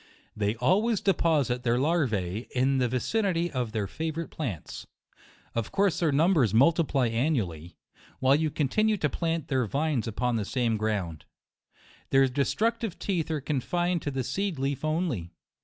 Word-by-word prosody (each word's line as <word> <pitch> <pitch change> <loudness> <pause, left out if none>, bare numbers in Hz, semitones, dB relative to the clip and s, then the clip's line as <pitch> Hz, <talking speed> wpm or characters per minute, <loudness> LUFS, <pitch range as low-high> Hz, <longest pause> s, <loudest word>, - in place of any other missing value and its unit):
They 105 +1 0
always 195 - +2
deposit 150 - +1
their 120 -1 +1
larvae 120 - 0
in 130 +1 +2
the 125 - +2
vi 125 - 0
cinity 175 - 0
of 125 -5 -2
their 110 -2 -1
favorite 160 - -4
plants. 110 - -5 0.7
Of 115 -2 -2
course 200 -3 +2
their 165 -4 +2
numbers 145 - +3
multiply 140 -1 +3
annually, 110 - -1 0.4
while 130 +1 +3
you 155 +1 +1
continue 210 +10 +1
to 150 -5 0
plant 165 -1 -2
their 130 -5 0
vines 140 -1 -1
upon 120 +2 -1
the 110 - -1
same 120 0 0
ground. 100 -8 -2 0.8
Their 135 0 +5
destructive 195 - -1
teeth 175 -6 -2
are 155 -2 -1
confined 175 +5 -1
to - - -3
the 135 -2 -2
seed 190 +6 -2
leaf 135 +1 -2
only. 155 - -1
135 Hz, 155 wpm, -27 LUFS, 115-165 Hz, 0.8 s, Their